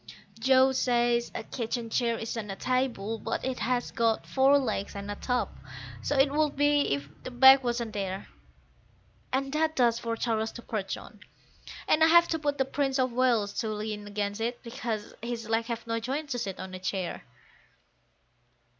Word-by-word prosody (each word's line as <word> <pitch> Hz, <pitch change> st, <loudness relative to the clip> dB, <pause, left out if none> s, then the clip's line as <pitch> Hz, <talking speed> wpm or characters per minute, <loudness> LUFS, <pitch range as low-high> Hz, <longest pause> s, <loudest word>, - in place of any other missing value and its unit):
Joe 265 Hz, 0 st, +5 dB
says 240 Hz, -2 st, +1 dB
a -, -, -3 dB
kitchen 230 Hz, -1 st, -4 dB
chair 235 Hz, -1 st, +1 dB
isn't 225 Hz, -2 st, -4 dB
a 195 Hz, -, -4 dB
table; 235 Hz, -2 st, -1 dB
but -, -, -3 dB
it 260 Hz, -1 st, -2 dB
has 245 Hz, +2 st, -1 dB
got 230 Hz, -1 st, +1 dB
four 270 Hz, +1 st, +4 dB
legs 220 Hz, -8 st, -2 dB
and 200 Hz, 0 st, -5 dB
a -, -, -4 dB
top, 250 Hz, +3 st, -2 dB, 0.5 s
so 290 Hz, -, -1 dB
it 275 Hz, +1 st, +4 dB
would 300 Hz, -1 st, +1 dB
be 290 Hz, 0 st, +3 dB
if 140 Hz, 0 st, -7 dB
the -, -, -6 dB
back 265 Hz, +2 st, +7 dB
wasn't 235 Hz, -2 st, -2 dB
there; 195 Hz, -1 st, -4 dB, 1.0 s
And 270 Hz, +1 st, -1 dB
that 315 Hz, +1 st, +1 dB
does 235 Hz, -2 st, +3 dB
for 230 Hz, -1 st, -2 dB
Charles 225 Hz, -2 st, -1 dB
to 240 Hz, -, -9 dB
perch 200 Hz, -3 st, -3 dB
on, 215 Hz, -, -13 dB, 0.7 s
and 310 Hz, -, +4 dB
I -, -, +7 dB
have 340 Hz, +1 st, +6 dB
to 325 Hz, -, 0 dB
put 290 Hz, -1 st, -1 dB
the 265 Hz, -, +2 dB
Prince 270 Hz, 0 st, -1 dB
of 255 Hz, -2 st, +1 dB
Wales 235 Hz, -5 st, +2 dB
to 220 Hz, -, -1 dB
lean 210 Hz, -1 st, -4 dB
against 205 Hz, +1 st, -3 dB
it, 240 Hz, +2 st, -3 dB
because 230 Hz, -3 st, -4 dB
his 235 Hz, -1 st, -4 dB
legs 225 Hz, +1 st, 0 dB
have 235 Hz, -1 st, -4 dB
no 230 Hz, 0 st, -1 dB
joints 275 Hz, +5 st, -4 dB
to 245 Hz, -, -1 dB
sit 195 Hz, -4 st, -4 dB
on 190 Hz, 0 st, -7 dB
a 185 Hz, -, -6 dB
chair. 185 Hz, -1 st, -3 dB
235 Hz, 185 wpm, -28 LUFS, 220-265 Hz, 1.0 s, back